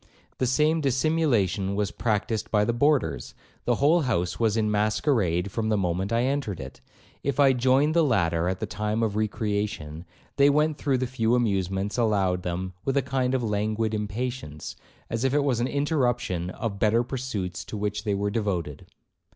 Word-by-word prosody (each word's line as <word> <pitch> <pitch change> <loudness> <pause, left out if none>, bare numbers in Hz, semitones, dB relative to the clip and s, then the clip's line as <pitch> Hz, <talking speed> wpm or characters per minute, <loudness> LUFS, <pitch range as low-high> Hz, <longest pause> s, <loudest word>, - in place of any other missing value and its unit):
The 130 - +1
same 155 +5 +2
dissimulation 125 - +1
was 100 -1 -1
practised 110 -1 -1
by 105 -1 +2
the 120 - 0
boarders; 145 +1 +1 0.3
the - - +2
whole 160 +5 +4
house 90 - -1
was 110 -2 +2
in 105 -1 +1
masquerade 105 - +1
from 110 +1 -1
the 110 - +2
moment 95 +1 -1
I 115 +1 +2
entered 130 -8 -1
it. - - -9 0.4
If 140 0 -2
I 135 -2 +6
joined 130 +4 +3
the 170 0 +4
latter 85 - +1
at 95 - -3
the - - -2
time 105 +2 -2
of 105 -2 -1
recreation, 105 -7 -2 0.3
they 140 0 +6
went 150 +1 +2
through 140 -3 +1
the 130 - -1
few 120 -2 +1
amusements 100 -2 0
allowed 100 -5 +1
them 90 +1 -4
with 135 0 0
a 140 - +2
kind 130 -1 0
of 125 - -1
languid 110 +1 -1
impatience, 105 - -4 0.3
as 115 +1 -3
if 135 +1 +1
it 145 - +3
was 130 -5 +1
an 120 - +1
interruption 120 - 0
of 100 +1 -4
better 110 +3 +3
pursuits 120 -9 -4
to 110 - -6
which 105 0 -2
they 105 -2 0
were 100 +1 -1
devoted. 90 - -3
110 Hz, 180 wpm, -26 LUFS, 100-130 Hz, 0.4 s, I